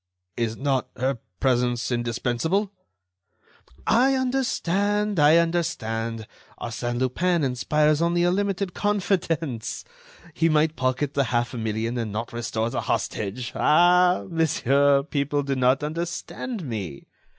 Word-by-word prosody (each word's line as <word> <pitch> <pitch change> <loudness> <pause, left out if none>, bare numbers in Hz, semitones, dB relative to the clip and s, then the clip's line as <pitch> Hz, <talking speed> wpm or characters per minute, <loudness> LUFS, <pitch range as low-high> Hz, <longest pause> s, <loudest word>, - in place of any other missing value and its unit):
"Is 115 -2 -2
not 135 -2 0
her 130 0 -1 0.2
presence 125 -1 +1
indispensable?" 120 - -1 1.1
"I 260 +4 +4
understand! 210 -6 0
I 150 +2 +6
understand! 115 -10 -1 0.3
Arsène 120 +1 -3
Lupin 165 +7 +1
inspires 150 +4 +1
only 170 +1 +2
a 175 - +3
limited 195 -1 -1
confidence. 170 - -1 0.5
He 165 +2 +2
might 155 0 +2
pocket 130 +2 -1
the 140 -1 +1
half 120 +1 -1
million 115 +1 -2
and 110 -3 -3
not 115 +3 -4
restore 115 -1 -2
the - - -2
hostage. 110 +4 -3
Ah! 180 +3 +4
monsieur, 140 -4 +2
people 145 -1 -1
do 140 0 -1
not 130 +2 +2
understand 170 - -4
me. 95 - -5
140 Hz, 115 wpm, -24 LUFS, 120-175 Hz, 1.1 s, I